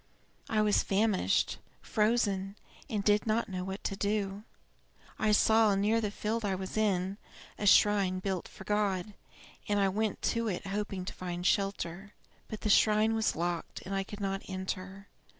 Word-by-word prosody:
I 215 Hz, -1 st, +2 dB
was 210 Hz, -1 st, +3 dB
famished, 195 Hz, -, +1 dB, 0.2 s
frozen, 205 Hz, -3 st, +1 dB, 0.3 s
and 210 Hz, -4 st, -1 dB
did 210 Hz, +2 st, +3 dB
not 220 Hz, +1 st, +1 dB
know 185 Hz, -1 st, -3 dB
what 190 Hz, +2 st, -6 dB
to 195 Hz, -, -2 dB
do. 200 Hz, 0 st, -1 dB, 0.8 s
I 215 Hz, -1 st, +2 dB
saw, 220 Hz, 0 st, +4 dB
near 210 Hz, +3 st, +2 dB
the 210 Hz, -, -1 dB
field 220 Hz, +2 st, -3 dB
I 195 Hz, -2 st, 0 dB
was 190 Hz, 0 st, -6 dB
in, 195 Hz, -2 st, 0 dB, 0.4 s
a 205 Hz, -, 0 dB
shrine 200 Hz, -2 st, +5 dB
built 185 Hz, -1 st, -3 dB
for -, -, -12 dB
God, 205 Hz, -1 st, 0 dB, 0.6 s
and 205 Hz, 0 st, +2 dB
I 195 Hz, -1 st, +3 dB
went 215 Hz, +2 st, -2 dB
to 230 Hz, -1 st, -1 dB
it 195 Hz, -1 st, -3 dB
hoping 195 Hz, -2 st, -3 dB
to -, -, -5 dB
find 175 Hz, -1 st, -5 dB
shelter. 195 Hz, 0 st, -1 dB, 0.3 s
But 215 Hz, -, -7 dB
the 215 Hz, -, -1 dB
shrine 215 Hz, +1 st, +4 dB
was 220 Hz, -1 st, +1 dB
locked, 170 Hz, 0 st, -3 dB
and 195 Hz, -, -5 dB
I 195 Hz, 0 st, 0 dB
could 205 Hz, +2 st, -9 dB
not 195 Hz, -1 st, -2 dB
enter. 190 Hz, +1 st, -5 dB
200 Hz, 170 wpm, -31 LUFS, 190-215 Hz, 0.8 s, shrine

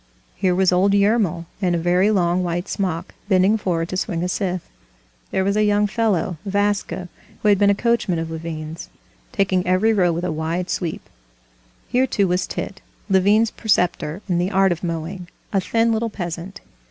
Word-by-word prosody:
Here 185 Hz, -1 st, +1 dB
was 185 Hz, 0 st, +3 dB
old 190 Hz, +3 st, +3 dB
Yermil 200 Hz, -5 st, +2 dB, 0.2 s
in 180 Hz, -2 st, +2 dB
a -, -, +1 dB
very 180 Hz, +4 st, +2 dB
long 180 Hz, -3 st, +2 dB
white 175 Hz, +2 st, -2 dB
smock, 180 Hz, -3 st, -3 dB, 0.2 s
bending 190 Hz, +2 st, +4 dB
forward 175 Hz, -5 st, -1 dB
to 185 Hz, -, -3 dB
swing 175 Hz, -3 st, -2 dB
a -, -, 0 dB
scythe; 180 Hz, -1 st, -2 dB, 0.6 s
there 190 Hz, -, 0 dB
was 200 Hz, +1 st, +1 dB
a 215 Hz, -, +3 dB
young 210 Hz, 0 st, +3 dB
fellow, 200 Hz, -6 st, 0 dB
Vaska, 205 Hz, -2 st, -1 dB, 0.4 s
who 210 Hz, -, +4 dB
had 200 Hz, -2 st, +4 dB
been 205 Hz, -1 st, +5 dB
a 200 Hz, -, +4 dB
coachman 235 Hz, -5 st, +1 dB
of 165 Hz, 0 st, -4 dB
Levin's, 160 Hz, 0 st, -6 dB, 0.4 s
taking 195 Hz, -6 st, +1 dB
every 190 Hz, +5 st, +3 dB
row 180 Hz, -4 st, +3 dB
with 170 Hz, +1 st, -3 dB
a 180 Hz, -, -1 dB
wide 165 Hz, +3 st, -2 dB
sweep. 170 Hz, -4 st, -3 dB, 0.8 s
Here, 255 Hz, +2 st, +2 dB
too, 200 Hz, -5 st, +1 dB
was 180 Hz, 0 st, 0 dB
Tit, 195 Hz, -, -5 dB, 0.3 s
Levin's 205 Hz, +4 st, +4 dB
preceptor 180 Hz, -4 st, 0 dB
in 175 Hz, -3 st, +1 dB
the 180 Hz, +2 st, 0 dB
art 195 Hz, -1 st, +3 dB
of 170 Hz, 0 st, -3 dB
mowing, 170 Hz, +2 st, -4 dB, 0.3 s
a 195 Hz, -, +2 dB
thin 230 Hz, +4 st, +1 dB
little 225 Hz, +1 st, 0 dB
peasant. 175 Hz, -1 st, -6 dB
185 Hz, 180 wpm, -21 LUFS, 175-205 Hz, 0.8 s, been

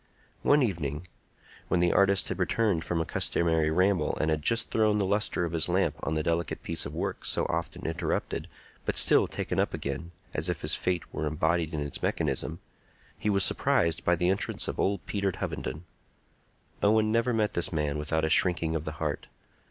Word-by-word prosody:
One 145 Hz, -1 st, +4 dB
evening, 80 Hz, -, -3 dB, 0.6 s
when 90 Hz, -, +1 dB
the 85 Hz, 0 st, +3 dB
artist 100 Hz, -1 st, +3 dB
had -, -, -4 dB
returned 105 Hz, -8 st, +1 dB
from 85 Hz, -, -1 dB
a 80 Hz, -, 0 dB
customary 80 Hz, -2 st, +1 dB
ramble 90 Hz, +4 st, +1 dB
and 80 Hz, -, +1 dB
had 75 Hz, -1 st, 0 dB
just 115 Hz, +8 st, +1 dB
thrown 110 Hz, -1 st, +3 dB
the 100 Hz, -, +1 dB
lustre 100 Hz, -2 st, +1 dB
of 85 Hz, -, -4 dB
his 80 Hz, -3 st, +2 dB
lamp -, -, +2 dB
on 80 Hz, -, -2 dB
the 80 Hz, -, 0 dB
delicate 85 Hz, 0 st, -1 dB
piece -, -, -1 dB
of -, -, -9 dB
work -, -, -3 dB
so -, -, +1 dB
often 85 Hz, -1 st, -3 dB
interrupted, 80 Hz, 0 st, -2 dB, 0.4 s
but -, -, -1 dB
still -, -, +6 dB
taken -, -, -3 dB
up -, -, 0 dB
again, 70 Hz, +5 st, -4 dB, 0.2 s
as 80 Hz, +4 st, -1 dB
if 85 Hz, -2 st, -2 dB
his 75 Hz, +1 st, +2 dB
fate 90 Hz, -1 st, 0 dB
were 75 Hz, -, -2 dB
embodied 80 Hz, +1 st, 0 dB
in 75 Hz, -, -2 dB
its 70 Hz, 0 st, -4 dB
mechanism, 80 Hz, -, -1 dB, 0.6 s
he 105 Hz, -, -2 dB
was 100 Hz, -1 st, +3 dB
surprised 85 Hz, -2 st, +2 dB
by 90 Hz, -, +3 dB
the 90 Hz, +1 st, +1 dB
entrance 95 Hz, -, -1 dB
of -, -, -4 dB
old 100 Hz, -1 st, 0 dB
Peter 100 Hz, -1 st, -1 dB
Hovenden. 75 Hz, -, -4 dB, 1.0 s
Owen 110 Hz, +1 st, +3 dB
never 115 Hz, +2 st, +2 dB
met 110 Hz, -2 st, 0 dB
this 85 Hz, -, 0 dB
man 75 Hz, -2 st, -1 dB
without 80 Hz, +1 st, +1 dB
a -, -, 0 dB
shrinking 85 Hz, -1 st, +2 dB
of 80 Hz, -1 st, -3 dB
the 75 Hz, -, -3 dB
heart. 75 Hz, -2 st, -3 dB
85 Hz, 195 wpm, -28 LUFS, 80-100 Hz, 1.0 s, still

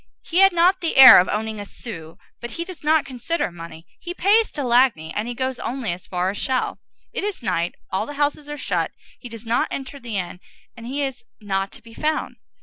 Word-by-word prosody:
He 350 Hz, -, 0 dB
had 390 Hz, 0 st, +7 dB
not 355 Hz, +2 st, +3 dB
the 330 Hz, -, -1 dB
air 260 Hz, -6 st, +12 dB
of 180 Hz, -, +2 dB
owning 220 Hz, 0 st, -2 dB
a -, -, -4 dB
sou, 165 Hz, -6 st, -9 dB, 0.2 s
but 240 Hz, -, -6 dB
he 335 Hz, +8 st, -5 dB
does 365 Hz, -3 st, -10 dB
not 310 Hz, 0 st, +3 dB
consider 265 Hz, -, -2 dB
money; 165 Hz, -1 st, -10 dB
he 350 Hz, 0 st, -7 dB
pays 425 Hz, +5 st, +3 dB
to 290 Hz, -, -3 dB
Lagny, 240 Hz, -10 st, +2 dB
and 210 Hz, +3 st, -2 dB
he 245 Hz, -, -4 dB
goes 260 Hz, +1 st, -2 dB
only 240 Hz, -7 st, -2 dB
as 175 Hz, -, -11 dB
far 180 Hz, +1 st, -1 dB
as 205 Hz, -, -6 dB
Chelles. 260 Hz, -1 st, -1 dB, 0.3 s
It -, -, -3 dB
is 410 Hz, -9 st, -4 dB
night; 170 Hz, -5 st, -1 dB, 0.2 s
all 190 Hz, -, -1 dB
the 290 Hz, -, -7 dB
houses 290 Hz, +1 st, -1 dB
are 295 Hz, -, -5 dB
shut; -, -, -1 dB, 0.3 s
he 245 Hz, -, -9 dB
does 230 Hz, 0 st, -10 dB
not 230 Hz, +2 st, +1 dB
enter 275 Hz, +1 st, -6 dB
the 235 Hz, -5 st, -5 dB
inn, 180 Hz, -1 st, -4 dB, 0.4 s
and 230 Hz, -1 st, -10 dB
he 280 Hz, +3 st, -2 dB
is 270 Hz, -, -4 dB, 0.2 s
not 195 Hz, -2 st, -2 dB
to -, -, -12 dB
be 230 Hz, -1 st, -14 dB
found. 310 Hz, +5 st, -2 dB
245 Hz, 230 wpm, -22 LUFS, 205-295 Hz, 0.4 s, air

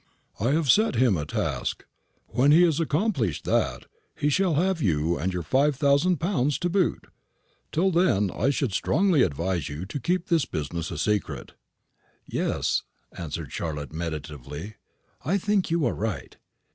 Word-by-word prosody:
I 115 Hz, -, +1 dB
have 160 Hz, -1 st, +1 dB
set 215 Hz, -, +3 dB
him 120 Hz, -4 st, +4 dB
a 75 Hz, -3 st, -3 dB
task. -, -, -2 dB, 0.4 s
When 135 Hz, +4 st, +3 dB
he 165 Hz, +4 st, +7 dB
has 165 Hz, -3 st, +3 dB
accomplished 155 Hz, -, 0 dB
that, -, -, 0 dB, 0.3 s
he 145 Hz, -, +1 dB
shall 180 Hz, +1 st, +2 dB
have 180 Hz, +2 st, +1 dB
you 85 Hz, -, +1 dB
and 90 Hz, +6 st, -1 dB
your 90 Hz, -1 st, -3 dB
five 135 Hz, -, +2 dB
thousand 145 Hz, +6 st, +3 dB
pounds 150 Hz, -5 st, 0 dB
to 175 Hz, -, -1 dB
boot. 185 Hz, -2 st, +1 dB, 0.7 s
Till 185 Hz, +4 st, +2 dB
then 160 Hz, -, +2 dB
I 135 Hz, -, 0 dB
should 135 Hz, -6 st, 0 dB
strongly 165 Hz, -, +2 dB
advise 85 Hz, -, 0 dB
you 75 Hz, +5 st, -5 dB
to 120 Hz, +9 st, -5 dB
keep 180 Hz, +7 st, 0 dB
this 165 Hz, -6 st, +2 dB
business 80 Hz, +2 st, -4 dB
a 85 Hz, -, -5 dB
secret. 105 Hz, +4 st, -1 dB, 0.7 s
"Yes," -, -, 0 dB, 0.3 s
answered 80 Hz, -4 st, -5 dB
Charlotte, 75 Hz, -3 st, -4 dB
meditatively; 80 Hz, -, -6 dB, 0.5 s
"I 180 Hz, +8 st, +1 dB
think 200 Hz, -1 st, 0 dB
you 165 Hz, -3 st, +1 dB
are 120 Hz, -, +1 dB
right. 100 Hz, -, -4 dB
130 Hz, 160 wpm, -26 LUFS, -, 0.7 s, he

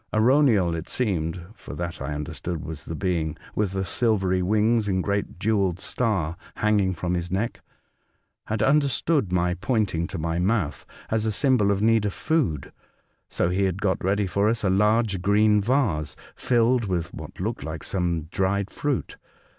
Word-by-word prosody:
Arauniel, 110 Hz, -, +4 dB
it 80 Hz, 0 st, -5 dB
seemed 90 Hz, -7 st, -1 dB
(for 90 Hz, -, -10 dB
that, 85 Hz, 0 st, -5 dB
I 75 Hz, +2 st, -3 dB
understood, 80 Hz, +2 st, -5 dB
was 80 Hz, -2 st, -7 dB
the 80 Hz, -, -5 dB
being 80 Hz, -4 st, -1 dB, 0.2 s
with 105 Hz, -3 st, -1 dB
the 95 Hz, 0 st, -1 dB
silvery 95 Hz, -5 st, +1 dB
wings 110 Hz, +3 st, +2 dB
and 95 Hz, -2 st, 0 dB
great 100 Hz, -2 st, -2 dB
jewelled 100 Hz, -3 st, +1 dB
star 95 Hz, -9 st, -1 dB, 0.2 s
hanging 105 Hz, -3 st, +2 dB
from 90 Hz, +1 st, -2 dB
his 90 Hz, 0 st, -2 dB
neck), 100 Hz, +6 st, -2 dB, 0.9 s
had 110 Hz, 0 st, 0 dB
understood 140 Hz, -, +2 dB
my 90 Hz, 0 st, +2 dB
pointing 95 Hz, -4 st, 0 dB
to -, -, -6 dB
my 80 Hz, +1 st, -1 dB
mouth 90 Hz, -, 0 dB, 0.2 s
as 110 Hz, 0 st, +1 dB
a -, -, +1 dB
symbol 125 Hz, -3 st, +3 dB
of 100 Hz, 0 st, +1 dB
need 115 Hz, -1 st, +3 dB
of 100 Hz, -, -1 dB
food, 145 Hz, -, -1 dB, 0.6 s
so 90 Hz, -, 0 dB
he 95 Hz, +2 st, +1 dB
had 95 Hz, 0 st, -1 dB
got 100 Hz, -3 st, 0 dB
ready 100 Hz, +2 st, +1 dB
for 100 Hz, +3 st, +1 dB
us 115 Hz, -1 st, -1 dB
a 95 Hz, -, +2 dB
large 105 Hz, 0 st, +2 dB
green 105 Hz, +2 st, +4 dB
vase 105 Hz, -, 0 dB, 0.2 s
filled 120 Hz, -1 st, +2 dB
with 85 Hz, -4 st, -2 dB
what -, -, -9 dB
looked 110 Hz, +5 st, -3 dB
like 80 Hz, -1 st, -6 dB
some 85 Hz, -4 st, -1 dB
dried 95 Hz, +1 st, 0 dB
fruit. 145 Hz, -3 st, -2 dB
100 Hz, 170 wpm, -25 LUFS, 90-110 Hz, 0.9 s, Arauniel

